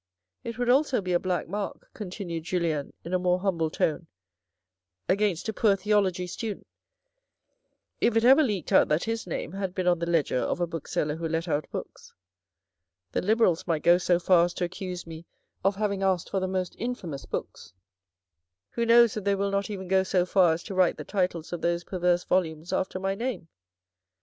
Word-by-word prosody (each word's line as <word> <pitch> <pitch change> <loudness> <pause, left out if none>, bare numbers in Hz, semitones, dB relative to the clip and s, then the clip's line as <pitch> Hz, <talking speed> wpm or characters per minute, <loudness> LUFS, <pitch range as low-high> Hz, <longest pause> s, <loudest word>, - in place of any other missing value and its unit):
" 90 0 -57
It 230 -1 -6
would 245 0 -1
also 265 +1 +3
be 185 -2 -2
a 175 - +3
black 180 -3 -2
mark," 200 +3 -5
continued 180 -5 -5
Julien 165 -5 -1
in 170 - -5
a 185 - +3
more 180 0 +2
humble 170 -5 0
tone, 160 +2 -1 0.5
" 95 0 -61 0.3
against 195 -2 +1
a 220 - -2
poor 210 -1 +3
theology 195 -2 +1
student 210 +4 -5 1.3
if 230 -1 +2
it 225 - +3
ever 265 +5 +7
leaked 205 - -1
out - - +6
that 150 +2 +1
his 225 -2 -3
name 160 - -4
had 190 -1 -4
been 185 - -1
on 175 -1 +3
the 170 0 -2
ledger 155 -6 +1
of - - -1
a 175 - +2
book 165 -3 -7
seller 150 +1 -1
who 165 0 -3
let 165 +2 -1
out 150 -2 -1
books. - - -8 1.0
The - - 0
Liberals 210 -5 +2
might 160 -3 0
go 175 +1 +6
so 180 -1 +2
far 175 -1 +4
as 175 - -5
to - - -2
accuse 180 0 -5
me 165 0 -10 0.4
of 195 +1 +2
having 200 -1 -1
asked 190 -3 0
for 195 - +1
the 185 - -1
most 185 -1 -2
infamous 185 - -5
books. 85 - -6 1.0
Who 235 0 -1
knows 235 -1 +6
if 215 - -4
they 200 0 +2
will 200 0 -1
not 200 +1 -1
even 190 -3 -5
go 190 +1 +3
so 185 -1 +1
far 180 -3 +4
as 165 - -5
to - - -7
write 185 -2 +3
the - - -6
titles 180 -4 -2
of 175 - -4
those 170 0 0
perverse 180 -1 0
volumes 165 -2 -1
after 185 0 -1
my 195 +1 -1
name 200 -6 -4
185 Hz, 205 wpm, -27 LUFS, 170-200 Hz, 1.3 s, ever